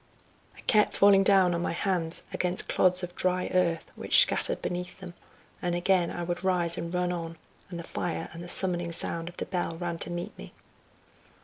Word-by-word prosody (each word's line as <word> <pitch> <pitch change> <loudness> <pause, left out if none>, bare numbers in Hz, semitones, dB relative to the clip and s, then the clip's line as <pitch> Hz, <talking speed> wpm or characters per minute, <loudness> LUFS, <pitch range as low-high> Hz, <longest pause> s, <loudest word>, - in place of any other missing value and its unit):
I - - -12
kept 215 -3 +2
falling 200 -1 +6
down 190 -2 +4
on 170 - -2
my 175 - -2
hands 170 -2 -2
against 180 0 -2
clods 180 0 +2
of 180 0 -6
dry 185 0 0
earth, 170 -3 +1
which - - +4
scattered - - +4
beneath 180 0 -5
them, 180 -2 -9 0.5
and 175 -1 -1
again 175 0 +1
I 175 - -5
would 175 +2 -4
rise 175 -3 +1
and 170 -1 -5
run 180 0 -1
on, 165 -1 -5 0.3
and 175 - -7
the - - -6
fire 165 -1 -4
and 170 +1 -8
the 175 - -7
summoning 175 -2 +4
sound 165 0 -1
of 175 - -16
the - - -3
bell 175 -3 -3
ran 170 -1 -4
to - - -3
meet 175 0 -5
me. - - -11
175 Hz, 200 wpm, -28 LUFS, 170-185 Hz, 0.5 s, falling